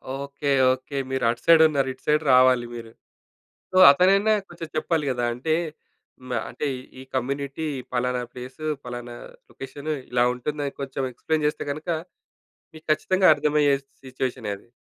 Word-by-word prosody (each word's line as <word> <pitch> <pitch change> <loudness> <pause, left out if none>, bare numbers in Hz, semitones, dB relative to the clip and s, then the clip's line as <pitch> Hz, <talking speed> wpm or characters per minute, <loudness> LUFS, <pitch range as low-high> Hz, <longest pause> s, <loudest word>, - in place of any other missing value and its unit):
Okay. 140 +1 -4 0.2
Okay. 130 +2 -7
మీరటు 120 -2 0
సైడున్నారు. 155 -5 +5
ఇటు 130 - -25
side 150 +1 +3
రావాలి 125 -1 +5
మీరు. 115 -1 -9 0.8
సో, 185 - -2
అతనైనా 195 +8 +4 0.2
కొంచెం 170 -2 -8
చెప్పాలి 160 -1 0
గదా! 120 -1 -1
అంటే, 155 +6 -1 0.7
హ్మ్, 130 0 -8
ఆహ్, - - -4
అంటే, 150 - -4 0.3
ఈ - - -8
కమ్యూనిటీ, 140 +4 -2 0.3
పలానా 125 0 0
ప్లేసు, 130 +5 -8 0.2
పలానా 120 -1 -7 0.3
లొకేషను, 145 +3 -6 0.2
ఇలా 120 0 +3
ఉంటుందని 145 +3 -4
కొంచెం 135 0 -3
ఎక్స్‌ప్లైన్ 155 +5 -1
చేస్తే 150 - -2
గనకా, 160 +3 -3 0.8
మీకు 155 - -14
ఖచ్చితంగా 185 +5 +2
అర్థమయ్యే 150 -2 +2 0.3
సిట్యుయేషనే 130 -4 -4
అది. 100 - -21
140 Hz, 140 wpm, -24 LUFS, 125-155 Hz, 0.8 s, సైడున్నారు